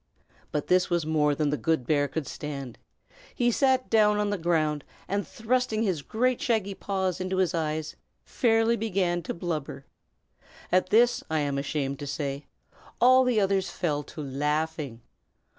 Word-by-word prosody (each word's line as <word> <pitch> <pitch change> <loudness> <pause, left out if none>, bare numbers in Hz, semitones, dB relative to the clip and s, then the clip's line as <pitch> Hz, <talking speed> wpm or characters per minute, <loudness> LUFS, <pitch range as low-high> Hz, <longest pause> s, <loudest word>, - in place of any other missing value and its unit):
But 150 - -2
this 180 0 +3
was 170 -3 0
more 150 -2 +2
than 150 -1 0
the 150 - 0
good 160 -5 0
bear 145 0 +2
could 145 +2 -4
stand. 140 -5 -6 0.6
He 240 -1 +2
sat 260 +1 +2
down 210 -2 +4
on 210 0 0
the 205 - 0
ground, 155 -3 +1 0.2
and 200 +1 -2
thrusting 230 -1 0
his 185 -8 0
great 245 - 0
shaggy 215 -5 0
paws 190 -2 -2
into 185 +1 -2
his 185 -1 +2
eyes, 155 -1 -2 0.3
fairly 225 -1 +2
began 190 -6 0
to 165 - -4
blubber. 155 -5 -4 0.9
At 185 +1 +3
this, 240 +2 +4
I 160 -1 +1
am 140 -1 -1
ashamed 140 -1 -2
to 145 - -6
say, 140 0 -3 0.5
all 255 +2 +6
the 250 -3 +2
others 195 -1 +1
fell 150 -5 -1
to 155 - -8
laughing. 150 -2 -2
175 Hz, 160 wpm, -27 LUFS, 150-210 Hz, 0.9 s, all